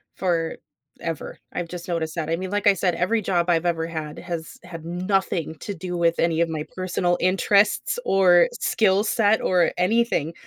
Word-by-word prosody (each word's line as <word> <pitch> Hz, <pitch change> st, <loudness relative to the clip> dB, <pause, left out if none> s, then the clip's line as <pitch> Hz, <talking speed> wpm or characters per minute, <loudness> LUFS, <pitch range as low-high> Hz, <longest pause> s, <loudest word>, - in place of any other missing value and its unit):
forever; 180 Hz, -, -4 dB
I've 175 Hz, -1 st, -4 dB
just 175 Hz, -1 st, -7 dB
noticed 165 Hz, -3 st, -2 dB
that, 160 Hz, -2 st, -3 dB
I 165 Hz, -, +1 dB
mean, 185 Hz, +2 st, -5 dB
like 205 Hz, 0 st, 0 dB
I 200 Hz, -, +7 dB
said, 180 Hz, -2 st, 0 dB
every 185 Hz, +7 st, 0 dB
job 180 Hz, -3 st, 0 dB
I've 170 Hz, 0 st, +2 dB
ever 165 Hz, -1 st, 0 dB
had 155 Hz, -2 st, -6 dB
has 170 Hz, -2 st, -6 dB
had 165 Hz, -2 st, -9 dB
nothing 180 Hz, -2 st, -1 dB
to 205 Hz, -, -4 dB
do 180 Hz, 0 st, -5 dB
with 170 Hz, -1 st, +1 dB
any 165 Hz, -1 st, +1 dB
of 170 Hz, -, +1 dB
my 155 Hz, -2 st, -3 dB
personal 180 Hz, -1 st, 0 dB
interests, 200 Hz, -, +2 dB
or 180 Hz, -3 st, +5 dB
skill 200 Hz, -2 st, +2 dB
set, 220 Hz, -1 st, +2 dB
or 180 Hz, -2 st, +2 dB
anything. 180 Hz, -4 st, +1 dB
175 Hz, 180 wpm, -23 LUFS, 165-195 Hz, -, I